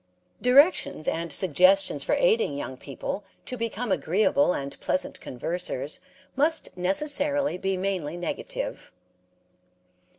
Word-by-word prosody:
Directions 260 - +4
and 165 0 -1
suggestions 185 +3 +4
for - - +1
aiding 455 - +2
young 130 -2 -5
people 140 +9 -5 0.2
to 255 - -4
become 230 -1 -3
agreeable 190 - +2
and 140 -4 -4
pleasant 185 - -2
conversers 145 +1 -4 0.4
must 310 +4 0
necessarily 285 +9 +1
be 190 0 -1
mainly 180 -4 -2
negative. 175 -2 -5
190 Hz, 105 wpm, -26 LUFS, 165-265 Hz, 0.4 s, Directions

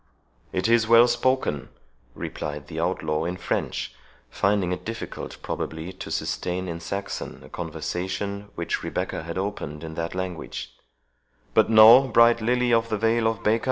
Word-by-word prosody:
"It 95 +3 0
is 115 -1 +4
well 115 +1 +7
spoken," 130 - 0 0.5
replied 75 0 -5
the - - -5
outlaw 75 0 -1
in 90 +1 -3
French, - - -2 0.4
finding 100 -2 +1
it 90 - -3
difficult 115 0 -6
probably 80 +5 -4
to 95 - -8
sustain, 90 +1 -2
in 85 -1 -4
Saxon, 100 +4 -5
a - - -14
conversation 95 +5 -4
which 85 - -2
Rebecca - - -3
had 85 +2 -6
opened 95 -6 -4
in 80 -1 -6
that 85 +2 -4
language; 90 -9 -5 0.8
"but - - +4
know, 115 +4 +9
bright 115 -1 +5
lily 125 +1 +2
of 115 0 +2
the 110 - 0
vale 115 +1 +2
of 110 -2 -2
Baca! 110 +2 +3
100 Hz, 155 wpm, -25 LUFS, 85-115 Hz, 0.8 s, know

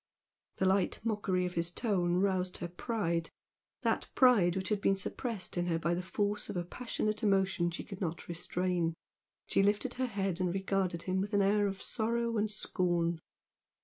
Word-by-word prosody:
The 190 - 0
light 190 0 +2
mockery 205 -5 0
of 180 - -3
his 170 0 0
tone 175 -3 +1
roused 185 -1 +1
her 175 - -4
pride, 170 -3 -2 0.5
that - - 0
pride 210 -9 +5
which 190 0 -2
had 210 -2 0
been 195 0 +3
suppressed 195 -1 -4
in 175 0 0
her 165 -2 +1
by 170 +1 0
the 175 - -1
force 205 +3 -1
of - - -3
a 175 - 0
passionate 215 +2 -2
emotion 190 -4 +2
she 170 - -5
could 195 -2 -9
not 165 -2 -3
restrain. 175 -1 -1 0.5
She - - +2
lifted 205 +5 +2
her 255 0 -1
head 195 -5 -2
and 180 -1 +1
regarded 190 -2 -1
him 185 0 0
with 205 +1 -2
an 200 - +4
air 205 +1 +3
of 195 -1 -4
sorrow 235 +1 0
and 215 +1 +1
scorn. 175 -5 0
190 Hz, 180 wpm, -32 LUFS, 175-210 Hz, 0.5 s, pride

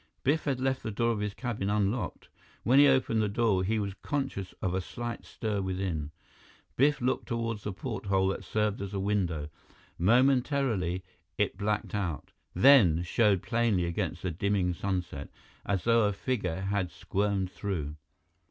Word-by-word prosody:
Biff 150 +4 +1
had 135 -3 0
left 130 0 0
the - - -4
door 115 +3 +1
of 110 - -2
his 105 -1 -3
cabin 115 -6 -3
unlocked. 105 +3 -1 0.4
When 130 +4 +5
he 145 - +8
opened 130 -4 +3
the 105 - +1
door, 100 -3 +2
he 110 +4 0
was 100 -2 -2
conscious 135 -10 -3
of 90 - -1
a 95 - 0
slight 120 +5 -6
stir 105 -3 -3
within. 90 -5 -2 0.7
Biff 145 +1 +3
looked 125 +2 0
toward 115 -3 -2
the 105 - -4
porthole 100 -3 -1
that 95 - -3
served 105 -2 -1
as 100 0 -5
a - - -1
window. 90 -7 -1 0.5
Momentarily, 120 - +2 0.3
it 105 - +1
blacked 105 +2 -2
out, 90 -7 -3 0.2
then 105 - +6
showed 100 0 +2
plainly 115 -6 +1
against 85 0 -3
the 90 - -1
dimming 95 +1 0
sunset, 90 -6 -3 0.4
as 100 -3 0
though 115 -1 +4
a 105 - 0
figure 95 -6 -2
had 100 -2 -1
squirmed 95 +1 -1
through. 80 -9 -3
100 Hz, 160 wpm, -29 LUFS, 95-115 Hz, 0.7 s, he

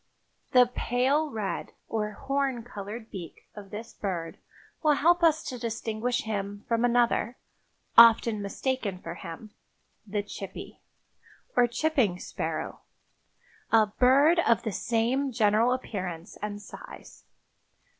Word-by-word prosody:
The 250 -1 +8
pale 255 +5 0
red 215 -6 -4
or 210 -1 -2
horn 270 0 -1
colored 220 0 -8
beak 175 -4 -9
of 205 -2 -10
this 220 +3 -8
bird 175 -5 -4 0.4
will 305 -2 +4
help 345 +5 +3
us 320 -2 +4
to 250 - -6
distinguish 230 +1 -2
him 205 -2 -4
from 230 0 +1
another, 240 0 +2 0.6
often 230 -2 +7
mistaken 205 0 -2
for 170 -2 -7
him—the 205 +3 -8
chippy, 200 -1 -8 0.7
or 245 - +5
chipping 240 - +1
sparrow, - - -4 0.9
a 225 -1 +6
bird 280 +7 +5
of 235 -9 +3
the 220 - -2
same 240 +6 0
general 220 +1 +3
appearance 185 -8 -4
and 205 0 -5
size. - - -12
230 Hz, 115 wpm, -28 LUFS, 205-255 Hz, 0.9 s, The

